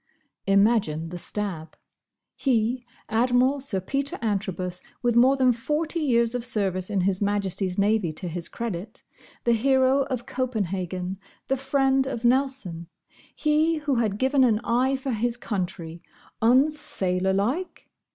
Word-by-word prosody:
'" - - -54
Imagine 195 -7 +2
the 175 - -6
stab. 175 -6 -3 0.6
He, 245 -1 0 0.3
Admiral 245 +4 +2
Sir 260 -8 -1
Peter 275 +9 -2
Antrobus, 190 -4 -2 0.2
with 240 -1 +2
more 260 +3 +5
than 255 -1 +4
forty 300 +7 -1
years 235 -6 +2
of 245 -1 -2
service 195 -6 -1
in 200 -3 0
His 190 +1 0
Majesty's 195 -2 -1
Navy 205 -3 +2
to 180 +4 -5
his 170 0 -4
credit; 215 -2 -6 0.4
the 235 - +3
hero 265 +3 +3
of 250 -3 -4
Copenhagen; 195 -8 -3 0.3
the 270 - +3
friend 270 0 +1
of 240 -3 -4
Nelson; 245 -10 0 0.5
he, 310 +2 +2
who 290 -4 -1
had 215 -4 0
given 265 +3 +3
an 230 -4 +4
eye 255 +4 +2
for 265 0 -3
his 235 +1 -1
country—unsailor 190 - 0
like! 250 - -2
230 Hz, 135 wpm, -25 LUFS, 190-265 Hz, 0.6 s, more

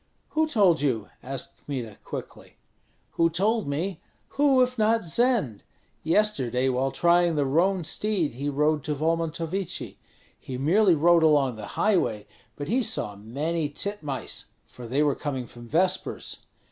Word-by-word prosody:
"Who 315 0 +1
told 195 - +3
you?" 120 -8 -1
asked 135 0 -7
Kmita, 120 -7 -5
quickly. - - -8 0.6
"Who 165 0 +2
told 205 +5 +1
me? 160 +5 -3 0.3
Who, 275 -3 +4
if 250 0 -2
not 225 +1 +3
Zend? 190 - +1 0.4
Yesterday 135 - +1
while 130 +1 0
trying 175 +2 +3
the 145 -2 +1
roan 175 +6 +2
steed 180 - -1
he 140 +4 -3
rode 150 +1 +1
to 150 - -1
Volmontovichi; 165 +4 -2 0.4
he 130 - -6
merely 175 +7 +4
rode 170 +2 +5
along 145 -6 +3
the 105 -2 -8
highway, 175 - +1 0.3
but 145 - -6
he 245 +6 +2
saw 215 - -2
many 145 +10 -2
titmice, 150 -4 -3 0.2
for 120 -1 -11
they 135 +5 +1
were 145 -2 +2
coming 135 -4 -4
from 120 +1 -13
vespers. 175 +8 0
160 Hz, 145 wpm, -26 LUFS, 135-195 Hz, 0.6 s, rode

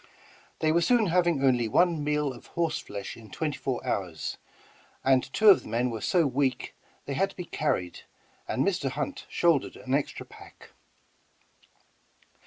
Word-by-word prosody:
They 155 - +3
were 170 +2 +3
soon 235 +5 +3
having 170 -5 +2
only 125 -3 +3
one 170 +5 +2
meal 150 -2 0
of 120 - -14
horse 170 -2 -1
flesh 100 -1 -7
in 110 -2 -14
twenty 150 +7 -3
four 130 -3 -3
hours, 90 -5 -3 0.6
and 130 -1 +2
two 215 -1 +5
of 195 - +7
the - - -12
men 120 +2 0
were 110 -2 -5
so 175 - +2
weak 135 -1 -1 0.3
they 140 - -3
had 195 +9 +1
to - - -15
be 180 - -6
carried, 90 - -2 0.5
and - - 0
Mr. - - 0
Hunt - - -4
shouldered 170 -6 +2
an 130 - -5
extra 140 0 -1
pack. - - -15
145 Hz, 165 wpm, -28 LUFS, 125-170 Hz, 0.6 s, of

